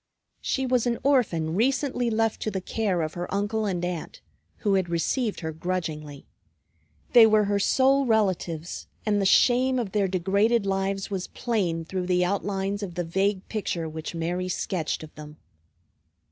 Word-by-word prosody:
She 265 Hz, -, -1 dB
was 250 Hz, -1 st, +1 dB
an 235 Hz, -1 st, 0 dB
orphan 190 Hz, -, +2 dB
recently 250 Hz, -, +1 dB
left 225 Hz, -1 st, 0 dB
to -, -, -1 dB
the 195 Hz, -2 st, -2 dB
care 185 Hz, -3 st, -1 dB
of 155 Hz, -, -4 dB
her 175 Hz, 0 st, -5 dB
uncle 205 Hz, +2 st, -1 dB
and 175 Hz, -3 st, -1 dB
aunt, 175 Hz, -3 st, -5 dB, 0.4 s
who 205 Hz, -3 st, 0 dB
had 190 Hz, -3 st, +1 dB
received 205 Hz, +7 st, -1 dB
her 160 Hz, -1 st, -3 dB
grudgingly. 155 Hz, -4 st, -4 dB, 0.9 s
They 230 Hz, -2 st, +9 dB
were 215 Hz, -1 st, +4 dB
her 205 Hz, 0 st, +1 dB
sole 270 Hz, +5 st, +3 dB
relatives; 180 Hz, -7 st, -1 dB, 0.2 s
and 205 Hz, -2 st, +2 dB
the 195 Hz, -, +3 dB
shame 255 Hz, +5 st, +4 dB
of 230 Hz, -6 st, -2 dB
their 200 Hz, 0 st, +1 dB
degraded 200 Hz, +5 st, +2 dB
lives 195 Hz, 0 st, -1 dB
was 190 Hz, -2 st, -3 dB
plain 180 Hz, -9 st, -1 dB
through 180 Hz, +1 st, -3 dB
the 180 Hz, -1 st, +2 dB
outlines 200 Hz, +1 st, -2 dB
of 185 Hz, -4 st, -5 dB
the 175 Hz, -, -1 dB
vague 190 Hz, +3 st, 0 dB
picture 180 Hz, -6 st, -3 dB
which 160 Hz, +1 st, -6 dB
Mary 175 Hz, +2 st, -2 dB
sketched 175 Hz, -3 st, -2 dB
of 155 Hz, -, -11 dB
them. 150 Hz, 0 st, -11 dB
195 Hz, 165 wpm, -26 LUFS, 175-220 Hz, 0.9 s, They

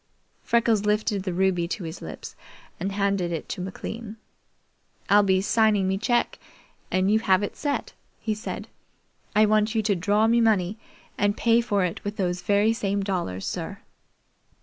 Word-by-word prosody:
Freckles 230 Hz, -3 st, +2 dB
lifted 210 Hz, -1 st, +1 dB
the 185 Hz, -1 st, -3 dB
ruby 180 Hz, -1 st, +1 dB
to 190 Hz, +2 st, -4 dB
his 165 Hz, +1 st, -7 dB
lips -, -, -8 dB, 0.4 s
and 195 Hz, -, -2 dB
handed 195 Hz, -3 st, 0 dB
it 165 Hz, -, -4 dB
to 190 Hz, -, -4 dB
McLean. 215 Hz, +4 st, -6 dB, 0.9 s
"I'll 205 Hz, +1 st, +7 dB
be 190 Hz, -2 st, +2 dB
signing 215 Hz, -2 st, +3 dB
me 190 Hz, 0 st, 0 dB
cheque 240 Hz, +3 st, 0 dB, 0.5 s
and 185 Hz, +2 st, +2 dB
you 220 Hz, -, +4 dB
have 195 Hz, -2 st, +3 dB
it 205 Hz, -, -4 dB
set," 290 Hz, -1 st, -3 dB, 0.3 s
he 220 Hz, -, -1 dB
said. 215 Hz, +4 st, -6 dB, 0.7 s
"I 215 Hz, +1 st, +6 dB
want 215 Hz, +1 st, +2 dB
you 220 Hz, -, +2 dB
to 205 Hz, -1 st, +2 dB
draw 205 Hz, +5 st, +2 dB
me 235 Hz, +1 st, +4 dB
money 210 Hz, -2 st, +2 dB, 0.4 s
and 205 Hz, +1 st, +2 dB
pay 235 Hz, 0 st, +4 dB
for 205 Hz, -5 st, +1 dB
it 175 Hz, -, -4 dB
with 205 Hz, +1 st, -4 dB
those 180 Hz, -2 st, -1 dB
very 205 Hz, +2 st, +3 dB
same 200 Hz, -2 st, -1 dB
dollars, 175 Hz, -, -3 dB
sir." -, -, -4 dB
205 Hz, 170 wpm, -25 LUFS, 190-220 Hz, 0.9 s, I'll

